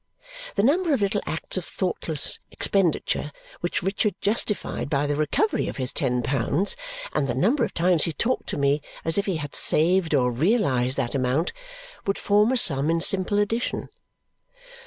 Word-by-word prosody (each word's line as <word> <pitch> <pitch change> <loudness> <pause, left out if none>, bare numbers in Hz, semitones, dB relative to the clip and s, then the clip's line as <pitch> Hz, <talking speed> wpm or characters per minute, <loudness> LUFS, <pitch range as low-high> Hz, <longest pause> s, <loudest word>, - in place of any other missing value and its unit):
The 200 - +1
number 315 +4 +2
of 225 - -4
little 200 +1 0
acts 160 - -2
of 180 - -3
thoughtless 165 -5 0
expenditure 175 -5 0 0.3
which 175 - -2
Richard 195 +1 0
justified 210 -7 -1
by 145 -1 0
the 145 0 -1
recovery 155 - 0
of - - -6
his 130 -1 0
ten 125 -3 +1
pounds, 140 - 0 0.4
and 140 - 0
the 120 - -2
number 235 - +2
of - - -2
times 170 -2 +3
he 165 - -1
talked 235 - -2
to - - -3
me 140 +1 +1 0.2
as 165 +4 +4
if 200 - -3
he 190 - 0
had 145 -2 -6
saved 170 0 +3
or 125 -2 +2
realized 135 - +1
that 125 -4 -2
amount, 135 +5 0 0.5
would 195 - 0
form 210 +3 +2
a 260 - +1
sum 150 - +3
in 165 0 +1
simple 190 +3 +3
addition. 225 +4 -1
170 Hz, 175 wpm, -24 LUFS, 140-205 Hz, 0.5 s, as